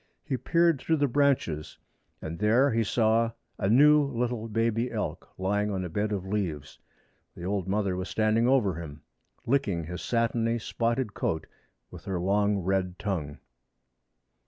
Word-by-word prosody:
He 140 Hz, -, -2 dB
peered 170 Hz, +1 st, +2 dB
through 165 Hz, -, +1 dB
the 145 Hz, -2 st, +2 dB
branches, 130 Hz, -, 0 dB, 0.5 s
and 80 Hz, +1 st, -5 dB
there 115 Hz, +7 st, +4 dB
he 115 Hz, 0 st, +2 dB
saw 115 Hz, +1 st, +2 dB, 0.3 s
a 95 Hz, -, 0 dB
new 150 Hz, +6 st, +6 dB
little 120 Hz, -4 st, -2 dB
baby 115 Hz, +2 st, 0 dB
elk -, -, -4 dB
lying 105 Hz, +2 st, 0 dB
on 95 Hz, -2 st, -2 dB
a -, -, -5 dB
bed 105 Hz, +5 st, -1 dB
of 95 Hz, -3 st, -2 dB
leaves. 90 Hz, -8 st, -3 dB, 0.6 s
The -, -, -9 dB
old 95 Hz, -1 st, -1 dB
mother 100 Hz, -1 st, 0 dB
was 95 Hz, +1 st, -4 dB
standing 110 Hz, +2 st, +2 dB
over 125 Hz, -8 st, +3 dB
him, 80 Hz, -, -6 dB
and 75 Hz, +1 st, -13 dB, 0.5 s
licking 100 Hz, -12 st, +1 dB
his 90 Hz, +3 st, -6 dB
satiny 115 Hz, 0 st, 0 dB
spotted 115 Hz, 0 st, -1 dB
coat 80 Hz, -4 st, -2 dB, 0.5 s
with 85 Hz, -3 st, -11 dB
her 95 Hz, -2 st, -2 dB
long 100 Hz, +3 st, +2 dB
red 95 Hz, -1 st, -1 dB
tongue. 80 Hz, -8 st, -3 dB
105 Hz, 155 wpm, -28 LUFS, 95-120 Hz, 0.6 s, new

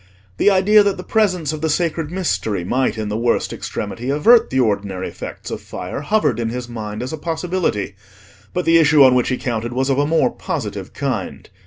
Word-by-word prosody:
The -, -, +4 dB
idea 205 Hz, +2 st, +5 dB
that 200 Hz, -1 st, +1 dB
the 180 Hz, -, -7 dB
presence 185 Hz, -9 st, +1 dB
of 155 Hz, -, -6 dB
the 160 Hz, -, 0 dB
sacred 160 Hz, 0 st, -1 dB
Mystery 135 Hz, -, -1 dB
might 120 Hz, +3 st, 0 dB
in 110 Hz, -1 st, -3 dB
the 105 Hz, -, -2 dB
worst 120 Hz, 0 st, 0 dB
extremity 115 Hz, +5 st, -5 dB
avert 220 Hz, -, +5 dB
the 130 Hz, -, 0 dB
ordinary 100 Hz, -5 st, -1 dB
effects -, -, -8 dB
of -, -, -5 dB
fire 90 Hz, +9 st, -6 dB
hovered 150 Hz, -, +1 dB
in 115 Hz, -1 st, -1 dB
his 125 Hz, +1 st, -5 dB
mind 110 Hz, -2 st, -6 dB
as 130 Hz, -, -5 dB
a 160 Hz, -, -5 dB
possibility; 165 Hz, -, -2 dB, 0.6 s
but 180 Hz, -, -2 dB
the 165 Hz, 0 st, +5 dB
issue 150 Hz, -2 st, +6 dB
on 130 Hz, -1 st, +6 dB
which 125 Hz, -1 st, +2 dB
he 130 Hz, -, 0 dB
counted 120 Hz, -1 st, -3 dB
was 130 Hz, +2 st, 0 dB
of 135 Hz, -, +1 dB
a 145 Hz, -, +2 dB
more 160 Hz, +1 st, +2 dB
positive -, -, -5 dB
kind. -, -, -4 dB
140 Hz, 205 wpm, -19 LUFS, 115-170 Hz, 0.6 s, issue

